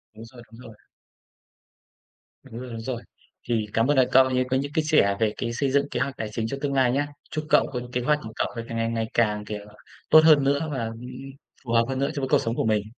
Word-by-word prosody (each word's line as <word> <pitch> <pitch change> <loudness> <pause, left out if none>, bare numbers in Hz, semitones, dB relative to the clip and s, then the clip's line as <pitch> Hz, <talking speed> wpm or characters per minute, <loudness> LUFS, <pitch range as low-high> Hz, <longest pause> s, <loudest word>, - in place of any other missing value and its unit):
Đúng 110 - -10
rồi, 120 +1 -14
đúng 115 - -14
rồi. 115 -3 -12 1.7
Đúng 115 - -9
rồi, 130 - -8
đúng 115 -1 -6
rồi. 120 0 -4 0.5
Thì 115 -3 0
cảm 115 +2 +2
ơn, 145 -1 +2
ờ, 130 - +6
cậu 130 0 +6 0.2
có 130 - +2
những 140 +2 -3
cái 160 -1 +1
sẻ 150 -11 +3
về 110 -1 +1
cái 115 -1 -3
xây 135 +3 -1
dựng 140 +1 +1
kế - - -2
hoạch 135 +1 -2
tài 110 - -4
chính 110 +1 -2
cho 140 - -4
tương 140 -1 -1
lai 130 -2 +3
nhá. 145 +3 0 0.2
Chúc 155 -1 -3
cậu - - +4
có 125 - -2
kế 125 - 0
hoạch 150 +4 +2
của 110 0 -8
cậu - - 0 0.2
càng 115 - -5
ngày 115 0 0
ngày 115 -1 -2
càng, 105 -2 +1
kiểu, 105 -1 -6 0.4
tốt 155 - +9
hơn 155 -3 +6
nữa 140 +3 +1
và, 130 -5 -2
ừm, 115 +1 -7 0.6
phù 120 - -6
hợp 115 0 +4
hơn 130 -1 -2
nữa 140 +1 +1
cho 140 - -2
với 130 - -2
cuộc - - +4
sống 115 +1 -2
của - - -1
mình! 110 -2 +1
125 Hz, 260 wpm, -25 LUFS, 115-140 Hz, 1.7 s, tốt